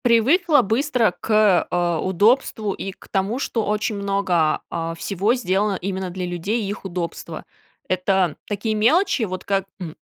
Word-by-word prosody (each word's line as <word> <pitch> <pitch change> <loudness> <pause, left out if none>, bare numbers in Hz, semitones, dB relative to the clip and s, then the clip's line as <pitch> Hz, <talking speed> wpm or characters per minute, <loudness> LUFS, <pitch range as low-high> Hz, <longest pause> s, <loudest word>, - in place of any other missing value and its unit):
Привыкла 290 - +4
быстро 235 0 +1
к, 215 -4 +3
э, 175 -1 0
удобству 210 +2 +2
и 195 - -5
к - - -18
тому, 195 +5 -1
что 230 -4 -2
очень 210 +1 -1
много, 195 -5 +1
а, 165 0 -3
всего 200 +7 0
сделано 200 -3 0
именно 190 0 -3
для 180 0 -4
людей 180 +6 -2
и 195 - -3
их 205 -1 -6
удобства. 175 -2 -5 0.4
Это 185 -2 +1
такие 210 +2 -2
мелочи, 275 - +3
вот 185 -3 -4
как, 195 -1 0
м, 165 -4 -7
200 Hz, 155 wpm, -22 LUFS, 185-225 Hz, 0.4 s, Привыкла